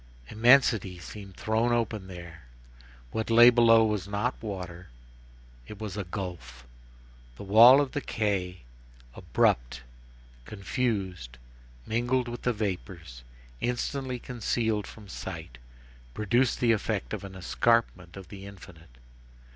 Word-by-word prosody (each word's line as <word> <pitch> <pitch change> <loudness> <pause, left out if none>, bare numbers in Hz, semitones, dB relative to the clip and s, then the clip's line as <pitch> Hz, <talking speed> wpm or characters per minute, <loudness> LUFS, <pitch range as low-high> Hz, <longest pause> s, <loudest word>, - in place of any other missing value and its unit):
Immensity 115 -5 +4
seemed 95 +2 -11
thrown 110 +2 0
open 110 -4 -1
there. 85 -5 -11 0.7
What 110 0 -3
lay 120 +2 +8
below 115 -2 +5
was 105 -3 -2
not 105 +5 -1
water, 90 -4 -7 0.8
it 105 - -10
was 105 -3 -6
a 105 - -3
gulf. 85 -10 -7 0.7
The - - -9
wall 115 +7 +8
of 145 -2 0
the 145 - -3
quay, 95 - -2 0.5
abrupt, - - 0 0.6
confused, 100 - -3 0.5
mingled 120 +2 0
with 120 0 -6
the 125 - +1
vapors, 90 - -5 0.4
instantly 125 +1 -2
concealed 115 -3 -2
from 105 -2 -13
sight, 65 -8 -8 0.6
produced 120 +4 +1
the 120 -2 +4
effect 100 - -2
of - - -4
an 95 -1 -9
escarpment 95 -2 0
of 95 -3 -11
the 100 -1 -10
infinite. 85 -8 -14
105 Hz, 120 wpm, -28 LUFS, 90-120 Hz, 0.8 s, lay